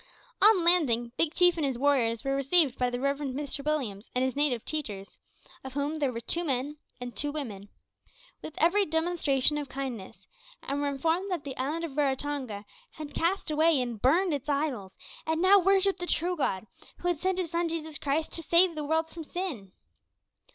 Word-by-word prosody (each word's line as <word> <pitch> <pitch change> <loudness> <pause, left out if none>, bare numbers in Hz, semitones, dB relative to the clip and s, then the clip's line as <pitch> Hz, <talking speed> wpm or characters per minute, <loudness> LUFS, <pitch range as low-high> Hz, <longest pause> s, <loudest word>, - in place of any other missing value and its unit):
On 415 -4 +6
landing, 250 -10 +4
Big 330 -1 +1
Chief 355 -1 +5
and 320 - -1
his 270 -3 -1
warriors 240 -5 +1
were 275 0 0
received 275 0 +4
by 250 -1 +2
the 245 0 -4
Reverend 280 0 -2
Mr 285 0 -3
Williams 250 -9 -2
and 250 - +2
his 260 -1 -1
native 280 -5 0
teachers 210 -11 -5 0.4
of 265 -1 -8
whom 290 +3 -2
there 280 -3 +1
were 230 - -5
two 340 +8 +1
men 285 0 -2 0.2
and 245 -2 -7
two 290 +6 +1
women 215 -10 -6 0.7
with 310 - -8
every 365 +6 +4
demonstration 310 -4 +1
of 285 -2 -6
kindness, 255 -7 -6 0.4
and 280 +1 -3
were 290 - 0
informed 325 +7 -1
that 355 -6 -3
the 275 -2 -6
island 295 +6 -3
of 310 -5 -5
Raratonga 265 -6 -1 0.3
had 305 -3 -9
cast 340 0 -1
away 310 -1 +3
and 240 -4 -4
burned 335 +7 +3
its 285 0 -4
idols, 275 -10 -2 0.3
and 320 0 0
now 385 +3 +6
worshipped 390 +1 +2
the 355 - -4
true 355 +2 0
God, 220 - -1 0.3
who 355 - -4
had 350 -4 0
sent 375 +1 0
His 355 -3 -2
Son 340 0 0
Jesus 315 -2 -5
Christ 295 +3 -1
to 330 - -3
save 340 +2 +4
the 305 -1 -4
world 320 +2 0
from 325 0 -9
sin. 295 - -5
290 Hz, 195 wpm, -28 LUFS, 260-330 Hz, 0.7 s, On